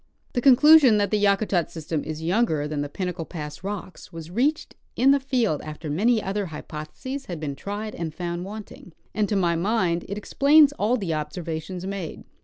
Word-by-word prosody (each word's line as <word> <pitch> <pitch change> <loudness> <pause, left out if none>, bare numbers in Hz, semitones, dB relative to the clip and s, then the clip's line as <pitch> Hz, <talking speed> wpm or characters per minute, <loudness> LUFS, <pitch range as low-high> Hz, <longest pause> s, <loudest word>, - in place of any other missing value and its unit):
The 245 - 0
conclusion 275 -2 +7
that 205 -2 0
the 210 -1 +1
Yakutat 200 -4 +2
system 160 -1 -4
is 155 0 -6
younger 165 -5 +1
than 150 -1 -3
the 145 - -3
Pinnacle 180 +1 -4
pass 150 -1 -8
rocks 195 -2 -7
was 165 0 -9
reached 275 - 0 0.2
in 270 +2 +5
the 280 - +4
field 250 - 0
after 155 0 -6
many 220 +8 +2
other 195 +1 -2
hypotheses 160 - -7
had 175 -3 -5
been 145 -3 -4
tried 205 +7 -5
and 165 -2 -4
found 175 +1 -4
Avanting, 200 -3 -9 0.2
and 210 0 0
to 210 - 0
my 175 -3 +2
mind 175 -2 0
it 200 - -4
explains 285 +6 +5
all 235 -1 +1
the 190 -7 -2
observations 160 +3 -4
made. 190 -4 -5
190 Hz, 185 wpm, -24 LUFS, 160-220 Hz, 0.2 s, conclusion